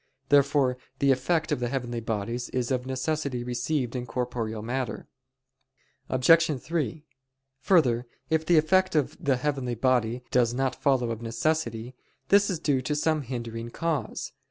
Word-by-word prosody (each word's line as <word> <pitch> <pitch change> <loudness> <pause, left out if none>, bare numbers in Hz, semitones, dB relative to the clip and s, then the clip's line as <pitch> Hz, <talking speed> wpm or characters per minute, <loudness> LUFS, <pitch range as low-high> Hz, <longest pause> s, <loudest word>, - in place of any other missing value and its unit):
Therefore 140 -2 +3 0.2
the 140 0 +3
effect 155 +5 +1
of 150 - +1
the 120 - -1
heavenly 120 -3 -3
bodies 115 +2 -3
is 125 0 -2
of 130 0 -1
necessity 130 -1 -2
received 125 +1 -2
in 125 -1 -3
corporeal 115 -3 -3
matter. 125 0 -3 1.0
Obj. 150 +3 +4
3: 155 -1 -3 0.5
Further, 125 -8 +3 0.2
if 160 0 +1
the 170 +1 +4
effect 185 +4 +3
of 150 -3 +1
the 135 -2 +2
heavenly 130 -3 -2
body 125 0 +1
does 120 -1 +2
not 130 -1 0
follow 130 -5 +2
of 115 0 -5
necessity, 120 -1 -1 0.4
this 200 +1 +5
is 185 - -1
due 145 -4 +1
to 150 +4 -2
some 155 +1 +1
hindering 115 -3 -5
cause. 165 +3 -3
130 Hz, 150 wpm, -27 LUFS, 120-150 Hz, 1.0 s, this